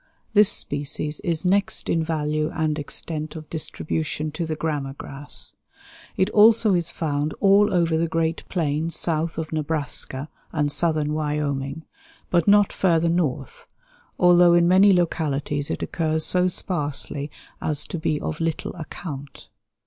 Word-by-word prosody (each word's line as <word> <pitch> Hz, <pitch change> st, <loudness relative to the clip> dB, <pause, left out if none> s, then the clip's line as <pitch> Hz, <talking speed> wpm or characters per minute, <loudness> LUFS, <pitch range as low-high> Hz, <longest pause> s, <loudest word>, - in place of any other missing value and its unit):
This 210 Hz, -1 st, +6 dB
species 145 Hz, +1 st, -1 dB
is 165 Hz, 0 st, -2 dB
next 195 Hz, +2 st, +1 dB
in 165 Hz, -1 st, +1 dB
value 155 Hz, -1 st, -1 dB
and 155 Hz, -1 st, 0 dB
extent 155 Hz, +1 st, -4 dB
of 155 Hz, -1 st, -8 dB
distribution 155 Hz, -1 st, -3 dB
to 165 Hz, +2 st, -4 dB
the 155 Hz, -, -2 dB
grama 145 Hz, -4 st, -3 dB
grass. 140 Hz, +1 st, -2 dB, 0.6 s
It 190 Hz, +3 st, +1 dB
also 215 Hz, 0 st, +5 dB
is 170 Hz, -2 st, 0 dB
found 150 Hz, -1 st, -2 dB
all 200 Hz, +1 st, +5 dB
over 170 Hz, -3 st, +2 dB
the 165 Hz, +1 st, +1 dB
great 165 Hz, 0 st, -1 dB
plains 160 Hz, -1 st, -1 dB
south 165 Hz, 0 st, -1 dB
of 160 Hz, -1 st, -4 dB
Nebraska 150 Hz, -2 st, -2 dB, 0.2 s
and 145 Hz, -2 st, 0 dB
southern 155 Hz, -2 st, 0 dB
Wyoming, 150 Hz, -1 st, -2 dB, 0.5 s
but 170 Hz, -2 st, +2 dB
not 205 Hz, 0 st, +5 dB
further 170 Hz, -3 st, +2 dB
north, 175 Hz, -, -2 dB, 0.5 s
although 175 Hz, -1 st, +6 dB
in 170 Hz, 0 st, +4 dB
many 190 Hz, +3 st, +6 dB
localities 150 Hz, -5 st, 0 dB
it -, -, -3 dB
occurs 160 Hz, -1 st, -1 dB
so 180 Hz, 0 st, +3 dB
sparsely 150 Hz, -5 st, -2 dB, 0.3 s
as 150 Hz, -2 st, -2 dB
to 175 Hz, -, -5 dB
be 155 Hz, -1 st, 0 dB
of 155 Hz, -, -4 dB
little 165 Hz, -1 st, -2 dB
account. 145 Hz, -3 st, -8 dB
160 Hz, 140 wpm, -23 LUFS, 150-175 Hz, 0.6 s, This